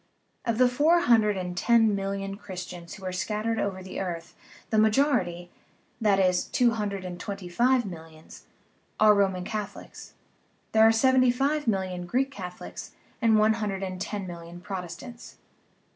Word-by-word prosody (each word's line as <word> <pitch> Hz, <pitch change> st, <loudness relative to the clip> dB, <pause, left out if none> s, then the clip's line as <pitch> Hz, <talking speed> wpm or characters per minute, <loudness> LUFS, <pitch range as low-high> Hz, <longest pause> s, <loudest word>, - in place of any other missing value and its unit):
Of 230 Hz, -2 st, 0 dB
the 255 Hz, 0 st, +5 dB
four 305 Hz, +8 st, +3 dB
hundred 220 Hz, -, +4 dB
and 180 Hz, -1 st, -4 dB
ten 225 Hz, +2 st, +4 dB
million 195 Hz, 0 st, -3 dB
Christians 180 Hz, -4 st, -8 dB
who 195 Hz, -, -11 dB
are 185 Hz, -, -2 dB
scattered 215 Hz, +4 st, -2 dB
over 190 Hz, -2 st, -2 dB
the 185 Hz, -, -6 dB
earth 175 Hz, -3 st, -5 dB, 0.4 s
the 220 Hz, -, +2 dB
majori 225 Hz, +2 st, +3 dB
ty 175 Hz, 0 st, -8 dB, 0.5 s
that 205 Hz, -3 st, +3 dB
is, 185 Hz, -1 st, +2 dB
two 245 Hz, -2 st, +2 dB
hundred 205 Hz, -4 st, -3 dB
and 175 Hz, -1 st, -6 dB
twenty 195 Hz, -1 st, -6 dB
five 240 Hz, +7 st, +2 dB
millions 160 Hz, -4 st, -11 dB, 0.5 s
are 215 Hz, 0 st, +7 dB
Roman 190 Hz, -3 st, +1 dB
Catholics; 210 Hz, +1 st, -7 dB, 0.6 s
there 220 Hz, 0 st, +6 dB
are -, -, +6 dB
seventy 255 Hz, +2 st, +4 dB
five 275 Hz, +3 st, 0 dB
million 185 Hz, -4 st, -1 dB
Greek 265 Hz, +7 st, 0 dB
Catholics 180 Hz, -8 st, -8 dB, 0.3 s
and 225 Hz, -2 st, +4 dB
one 215 Hz, +1 st, +4 dB
hundred 205 Hz, -3 st, -3 dB
and 185 Hz, -1 st, -5 dB
ten 205 Hz, -1 st, -4 dB
million 170 Hz, -1 st, -9 dB
Protestants. 190 Hz, +6 st, -8 dB
200 Hz, 160 wpm, -27 LUFS, 180-230 Hz, 0.6 s, are